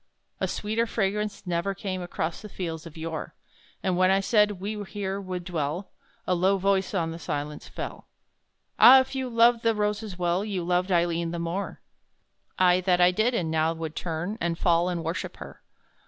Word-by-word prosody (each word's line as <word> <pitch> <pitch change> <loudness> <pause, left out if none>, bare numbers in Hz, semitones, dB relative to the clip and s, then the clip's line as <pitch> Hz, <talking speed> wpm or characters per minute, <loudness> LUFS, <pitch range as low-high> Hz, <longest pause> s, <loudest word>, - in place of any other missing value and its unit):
A - - 0
sweeter 220 +3 -1
fragrance 210 -1 -2
never 180 +3 -1
came 190 -1 -4
Across 175 -2 -3
the 210 - -9
Fields 165 -4 -5
of 165 - -13
Yore! 160 -1 -5 0.5
And 185 -1 +1
when 185 +1 +4
I 195 0 +4
said 210 +1 +3
"we 210 +2 -4
here 200 -1 -4
would 185 -2 -5
dwell," 170 +1 -3 0.3
A 185 - +1
low 190 +3 +3
voice 195 +1 +1
on 165 -3 0
the 165 - -7
silence 150 -1 -4
fell - - -7 0.7
"Ah! 265 +2 +10
if 260 - -6
you 260 -1 -2
loved 235 0 +4
the 230 -1 +2
roses 210 -2 -2
well, 175 +2 +1
You 200 -4 -3
loved 180 +2 0
Aileen 170 -1 +1
the 170 - -4
more." 170 +4 -4 0.8
"Ay, 180 0 +4
that 180 -1 +2
I 180 0 +6
did, 220 +6 +1
and 165 -7 -1
now 160 +1 +2
would 160 -1 -6
turn, 175 +6 -3
And 170 -1 0
fall 170 0 +2
and 170 -2 -2
worship 165 +2 -4
her! - - -10
185 Hz, 185 wpm, -26 LUFS, 170-205 Hz, 0.8 s, Ah